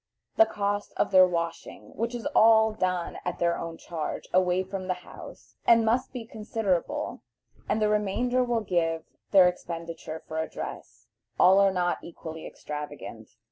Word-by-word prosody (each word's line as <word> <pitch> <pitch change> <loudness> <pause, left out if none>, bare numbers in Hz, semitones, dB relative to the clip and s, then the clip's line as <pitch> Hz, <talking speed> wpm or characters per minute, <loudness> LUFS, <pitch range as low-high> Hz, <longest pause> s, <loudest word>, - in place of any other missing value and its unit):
the 335 - +6
cost 205 0 -2
of - - +1
their 185 -1 +8
washing, 170 -1 -4
which 230 +2 -2
is 235 - -6
all 220 0 +6
done 185 -4 -2
at 180 - -3
their 170 -1 +1
own 165 -1 -6
charge, 160 -3 -5
away 185 0 +3
from 190 0 -6
the 185 - 0
house, - - -12
and 230 -1 +6
must 240 +3 +1
be 245 -3 -6
considerable, 215 -5 -2 0.5
and - - +1
the 215 - +3
remainder 210 +5 +1
will 240 -2 0
give 165 -5 0 0.3
their 190 -3 +7
expenditure 165 -2 -5
for 160 0 -2
dress. - - -8 0.3
All 190 +2 +7
are 200 0 +5
not 180 -1 0
equally 160 -1 -8
extravagant. 150 0 -8
185 Hz, 155 wpm, -27 LUFS, 170-220 Hz, 0.5 s, their